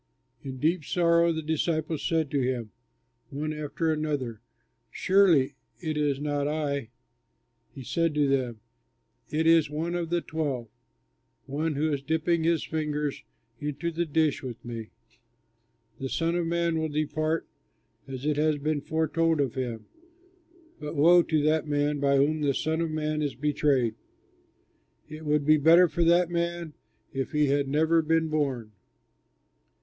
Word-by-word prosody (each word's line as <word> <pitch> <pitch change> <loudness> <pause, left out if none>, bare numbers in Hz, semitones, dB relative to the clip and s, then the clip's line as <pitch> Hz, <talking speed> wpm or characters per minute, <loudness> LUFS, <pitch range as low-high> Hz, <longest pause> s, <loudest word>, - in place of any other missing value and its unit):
In 135 -2 -6
deep 160 +4 +1
sorrow 170 +1 +3
the 160 -1 -3
disciples 160 0 -1
said 160 -3 0
to 140 - +1
him, 125 -4 -2 0.6
one 150 +2 -3
after 155 +2 -1
the 155 0 -2
other, 120 -6 -3 0.5
"Surely 185 -8 +3 0.3
it 155 -3 -3
is 145 -2 0
not 145 -1 -1
I?" 145 -5 -2 0.9
He 135 - -8
said 165 +4 0
to 145 -1 +3
them, 125 -5 -1 0.7
"It 160 +1 0
is 165 -2 +5
one 160 +3 -3
of 175 -2 -2
the 175 0 +1
twelve, 140 -9 -3 0.8
one 150 +3 -2
who 155 +2 0
is 140 - -2
dipping 160 +3 0
his 165 -1 +2
fingers 150 -2 -2 0.4
into 150 +3 -3
the 170 +1 -2
dish 155 -1 +1
with 120 -4 -8
me. 115 -2 -6 1.1
The 135 - -3
Son 165 +4 0
of 175 -1 0
Man 170 -1 0
will 160 0 -1
depart 155 +2 -1 0.6
as 135 0 -6
it 150 -1 +1
has 155 0 +2
been 150 0 -1
foretold 160 +1 0
of 135 -4 0
him, 120 -4 -4 0.9
but 150 +1 -6
woe 170 +4 +6
to 155 -3 0
that 155 0 +2
man 145 0 0
by 140 0 +3
whom 150 +3 +2
the 140 -2 +1
Son 160 +1 -1
of 165 - -1
Man 155 0 -2
is 145 -3 -2
betrayed! 140 -4 +1 1.1
It 155 +1 -9
would 150 -1 +2
be 155 +1 +6
better 165 +4 +6
for 170 +1 -1
that 175 +1 +4
man 170 -2 -2 0.4
if 135 +2 -3
he 150 -2 +2
had 140 0 +1
never 160 +4 +3
been 160 0 +1
born!" 135 -8 -1
150 Hz, 155 wpm, -27 LUFS, 140-160 Hz, 1.1 s, woe